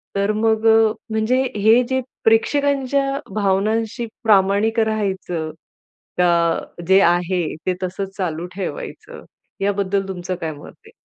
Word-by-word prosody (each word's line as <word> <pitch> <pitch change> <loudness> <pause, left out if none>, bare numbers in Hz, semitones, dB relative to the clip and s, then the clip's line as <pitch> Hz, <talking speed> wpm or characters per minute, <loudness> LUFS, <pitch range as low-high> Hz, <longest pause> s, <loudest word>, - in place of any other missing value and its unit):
तर 200 +1 +1
मग 220 +1 +1
अ, 220 0 +7 0.3
म्हणजे 220 +4 +1
हे 220 +4 +5
जे 260 0 +1 0.2
प्रेक्षकांच्या 275 +3 +2 0.2
भावनांशी 215 +4 0 0.2
प्रामाणिक 210 +1 +3
राहायचं 190 -7 -1 0.7
का? 170 -2 +3 0.3
जे 190 +1 +6
आहे 175 0 +2 0.2
ते 185 - +1
तसंच 190 +1 -4
चालू 170 -3 -3
ठेवायचं. 480 - -7 0.4
याबद्दल 200 -1 0
तुमचं 185 -1 -4
काय 165 -3 -4
मत 145 - -12
आहे? 445 - -15
200 Hz, 120 wpm, -20 LUFS, 185-225 Hz, 0.7 s, अ